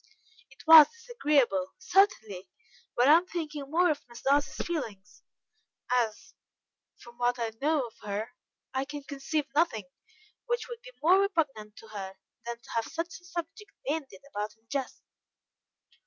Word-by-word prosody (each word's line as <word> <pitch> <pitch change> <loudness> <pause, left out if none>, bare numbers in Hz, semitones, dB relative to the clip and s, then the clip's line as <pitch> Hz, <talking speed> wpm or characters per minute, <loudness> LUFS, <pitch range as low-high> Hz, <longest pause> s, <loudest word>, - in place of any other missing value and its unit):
"It - - -17
was 315 -2 +11
disagreeable, 290 - 0
certainly, 350 - +1 0.5
but 245 +2 +4
I 305 +3 +9
am 355 +2 -2
thinking 300 -6 -5
more 345 +2 +4
of 295 - -3
Miss 235 0 -12
Darcy's 285 +2 +1
feelings, 225 - -5 0.7
as 235 -4 0 0.6
from 240 0 -15
what 245 0 +2
I 230 -2 -2
know 300 -2 +2
of 230 - -11
her, 210 +3 -4 0.4
I 265 0 0
can 290 +1 -7
conceive 280 +2 -2
nothing 225 - +1 0.6
which 480 0 -1
would 475 -1 -8
be - - -11
more 365 +4 +6
repugnant 290 - -1
to 225 - -13
her, 195 -2 -6 0.3
than 235 0 -3
to 235 - -20
have 230 -1 0
such 335 +2 -5
a - - -20
subject 345 +3 -6 0.2
bandied 280 -10 -3
about 210 -5 -5
in 225 +1 -39
jest." 275 -2 -3
280 Hz, 155 wpm, -29 LUFS, 225-330 Hz, 0.7 s, was